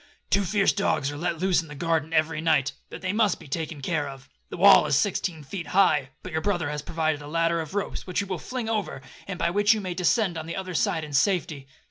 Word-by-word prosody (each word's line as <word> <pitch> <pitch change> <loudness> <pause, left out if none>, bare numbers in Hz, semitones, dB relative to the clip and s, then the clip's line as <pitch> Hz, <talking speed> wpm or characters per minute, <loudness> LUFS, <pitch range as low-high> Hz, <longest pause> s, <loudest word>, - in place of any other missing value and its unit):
'Two 200 +1 +3
fierce 195 +1 +2
dogs 145 -8 0
are - - -7
let 170 +1 -2
loose 185 +1 +2
in 165 - -12
the 150 - -9
garden 160 0 -1
every 155 -1 +1
night,—but 150 -3 -1
they 185 +1 -1
must 210 -3 +2
be 160 - -13
taken 155 -1 -4
care 150 -2 -1
of. 135 0 -11 0.2
The - - -7
wall 195 -3 +7
is 145 - +2
sixteen 180 -2 0
feet 170 +4 -6
high,—but 150 -9 +1
your 160 0 -1
brother 175 -7 -1
has 150 0 -3
provided 155 -1 -1
a 145 - -9
ladder 165 +1 +1
of 160 +4 -8
ropes, 205 - -3
which 180 - -4
he 205 - +1
will 185 -3 -4
fling 250 +3 -5
over, 210 -11 -2 0.2
and 190 -2 -4
by 170 -1 0
which 205 +3 +4
you - - -2
may 185 -3 -4
descend 180 0 +1
on 160 - -7
the 170 - -4
other 185 -1 -5
side 160 +2 0
in 150 -1 -8
safety.' 155 -4 +1
165 Hz, 240 wpm, -26 LUFS, 150-195 Hz, 0.2 s, wall